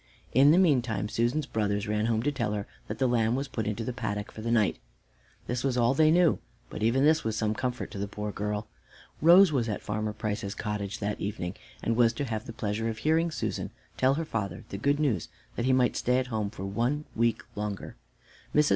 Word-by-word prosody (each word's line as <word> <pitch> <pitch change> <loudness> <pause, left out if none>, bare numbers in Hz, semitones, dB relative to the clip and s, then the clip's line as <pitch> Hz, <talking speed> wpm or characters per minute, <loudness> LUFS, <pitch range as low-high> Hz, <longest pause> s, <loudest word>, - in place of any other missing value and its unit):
In 135 +4 +7
the 160 - +6
meantime 125 - +2
Susan's 120 +7 0
brothers 105 -3 -1
ran 105 +1 0
home 115 -1 +1
to 145 - +1
tell 120 -7 -1
her 100 -1 -2 0.2
that - - -4
the 135 - +1
lamb 120 -2 +2
was 135 +2 -2
put 110 -5 -3
into 110 +2 -2
the 125 - -3
paddock 105 -3 -3
for 110 - -9
the 115 - -3
night. 110 -4 +2 0.7
This 125 +1 -2
was 130 -2 +1
all 120 +1 +4
they 155 +2 +5
knew, 170 -1 +4 0.3
but - - -6
even 120 +5 +3
this 155 +1 +4
was 110 -1 -1
some 110 -1 +1
comfort 125 +1 -3
to 100 - -6
the 100 - -2
poor 105 +1 -4
girl. 105 +1 -3 0.6
Rose 175 +2 +8
was 120 -6 0
at 105 - -3
Farmer 110 0 -2
Price's 105 -1 -3
cottage 105 -2 -3
that 105 0 -3
evening, 100 -3 -3 0.3
and 115 - +1
was 115 -1 +4
to 140 +5 -3
have 110 -3 -4
the - - -5
pleasure 110 +1 -2
of 110 - -4
hearing 160 +7 +2
Susan 160 - -3 0.3
tell 130 +1 +3
her 165 +2 -2
father 100 - -3
the 100 - -5
good 140 +5 +2
news 125 - +1 0.3
that 120 - -1
he 130 - +3
might 130 -2 +3
stay 125 +1 +2
at 130 - +1
home 105 -2 0
for 95 - -7
one 120 +9 -1
week 115 -1 +1
longer. 105 -1 -4 0.6
Mrs. 150 0 +5
115 Hz, 225 wpm, -28 LUFS, 105-130 Hz, 0.7 s, Rose